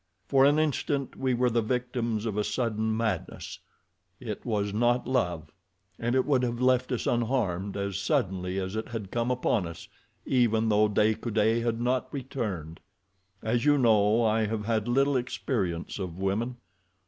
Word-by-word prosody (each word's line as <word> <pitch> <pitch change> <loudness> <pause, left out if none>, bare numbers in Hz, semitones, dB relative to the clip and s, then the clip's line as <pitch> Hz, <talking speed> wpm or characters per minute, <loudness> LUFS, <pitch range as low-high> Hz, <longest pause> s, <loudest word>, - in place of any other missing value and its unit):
For 135 +4 +4
an 145 +1 +4
instant 145 -3 0
we 130 -2 0
were 125 0 +2
the 115 0 +2
victims 120 -2 -2
of 110 -3 -2
a 105 - +1
sudden 110 -2 -1
madness—it 105 -2 -6
was 105 -4 -1
not 120 +3 +2
love—and 95 0 -3
it 130 - +3
would 135 -4 +2
have 120 -1 -1
left 130 0 +2
us, 125 - -1
unharmed, 110 -6 0
as 100 -1 -2
suddenly 95 -2 -1
as 95 +2 -4
it 110 - -3
had 110 -5 -6
come 120 +1 0
upon 120 -6 +1
us 85 0 -9 0.4
even 115 -3 +2
though 105 0 +4
De 105 +1 +3
Coude 110 0 +1
had 115 -1 -1
not 125 +1 0
returned. 105 - -4 0.6
As 115 +2 0
you 145 0 +4
know, 110 -2 +4
I 110 0 +2
have 105 -1 -3
had 110 -1 0
little 135 +3 +2
experience 105 -9 -2
of 90 -3 -5
women. 105 +6 -1
115 Hz, 160 wpm, -28 LUFS, 100-125 Hz, 0.6 s, For